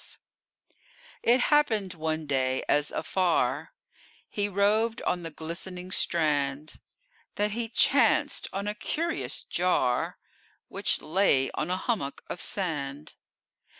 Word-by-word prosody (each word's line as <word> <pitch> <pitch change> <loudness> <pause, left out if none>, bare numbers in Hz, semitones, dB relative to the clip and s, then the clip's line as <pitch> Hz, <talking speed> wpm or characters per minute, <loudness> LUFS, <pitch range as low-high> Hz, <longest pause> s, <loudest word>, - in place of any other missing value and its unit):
It 245 +2 +4
happened 220 -11 +2
one 160 -1 -2
day, 130 -2 0
as 145 0 +3
afar 175 +3 0 0.6
He 205 -1 -2
roved 215 +4 +2
on 175 - 0
the 165 - -5
glistening 180 +4 -7
strand, 150 -4 0 0.6
That 210 +1 +1
he 230 +1 -3
chanced - - +3
on 200 +1 -3
a 210 - -1
curious 320 +10 -2
jar, 130 -9 0 0.5
Which - - -1
lay 155 -6 +3
on 155 - -3
a 185 - 0
hummock 185 - -2
of - - -4
sand. 150 -6 -3
180 Hz, 115 wpm, -28 LUFS, 150-205 Hz, 0.6 s, It